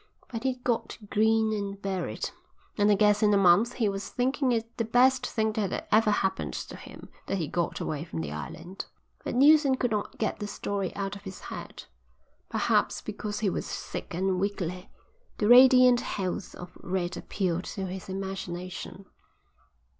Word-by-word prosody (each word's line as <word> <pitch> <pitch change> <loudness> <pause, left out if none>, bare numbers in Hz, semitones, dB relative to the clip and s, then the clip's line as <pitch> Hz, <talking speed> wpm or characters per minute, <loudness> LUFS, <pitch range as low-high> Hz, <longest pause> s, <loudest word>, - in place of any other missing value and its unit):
But 230 -2 -4
he'd 255 -1 -2
got 240 -3 0
to 215 - -10
grin 220 +1 +2
and 200 -1 -3
bear 190 -3 -2
it, - - -4 0.4
and 205 0 +3
I 205 - +6
guess 210 +1 +4
in 210 -1 +4
a - - +5
month 195 +5 +5
he 230 -4 +1
was 195 0 -3
thinking 260 +1 0
it 230 -1 -2
the 230 - +1
best 250 +3 +3
thing 220 -1 0
that 210 -3 -1
had - - -4
ever 215 0 +5
happened 190 -2 0
to - - -6
him - - -11 0.2
that 195 - -1
he 165 -5 -2
got 170 +1 -2
away 150 0 -3
from 85 - -5
the 75 -2 -5
island." 165 - -7 0.4
But - - -3
Neilson 285 +1 +6
could 245 -2 -1
not 210 -1 -2
get 215 - -1
the 205 - -4
story 200 -2 -3
out 200 0 -3
of 200 - -10
his 190 -2 -8
head. - - -8 0.7
Perhaps - - +1
because 210 0 -5
he 205 - +2
was - - -3
sick - - -6
and 185 +1 0
weakly, 185 -2 -3 0.5
the 210 - +1
radiant 250 0 +8
health 185 0 -4
of 180 0 -10
Red 180 -1 -2
appealed 180 -2 -2
to 195 - -4
his 190 +1 -7
imagination. 190 0 -5
205 Hz, 185 wpm, -28 LUFS, 185-225 Hz, 0.7 s, radiant